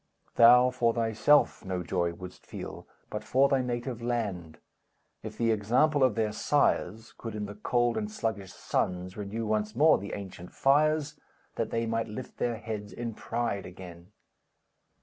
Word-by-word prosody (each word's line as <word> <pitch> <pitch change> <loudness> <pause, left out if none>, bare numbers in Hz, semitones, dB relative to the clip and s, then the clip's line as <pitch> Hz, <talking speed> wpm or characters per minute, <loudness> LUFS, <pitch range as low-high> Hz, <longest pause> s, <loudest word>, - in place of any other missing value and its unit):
Thou 125 +2 +7
for 120 -2 +1
thyself 115 +6 +3
no 95 -2 -3
joy 85 -1 0
wouldst 90 +1 -11
feel, - - -8 0.2
But - - -4
for 135 +2 +3
thy 135 -1 +2
native 120 -1 -3
land, 100 -10 -3 0.6
If - - -8
the 115 -1 +2
example 130 +8 +2
of 130 -5 +3
their 110 -2 0
sires 115 -4 0
Could 115 -2 -6
in 105 -1 -3
the 105 - -7
cold 120 +3 0
and 210 -1 -2
sluggish 110 - -3
sons 90 +1 -2
Renew 105 +2 -4
once 105 0 -1
more 155 +5 +5
the 100 +1 -7
ancient 95 -3 -8
fires, 150 +2 +2 0.3
That - - -2
they 115 0 -1
might 115 0 -1
lift 115 +4 -8
their 120 -2 -1
heads 105 -2 -6
in 120 -1 -5
pride 115 -3 -3
again. 90 0 -12
115 Hz, 160 wpm, -29 LUFS, 100-125 Hz, 0.6 s, Thou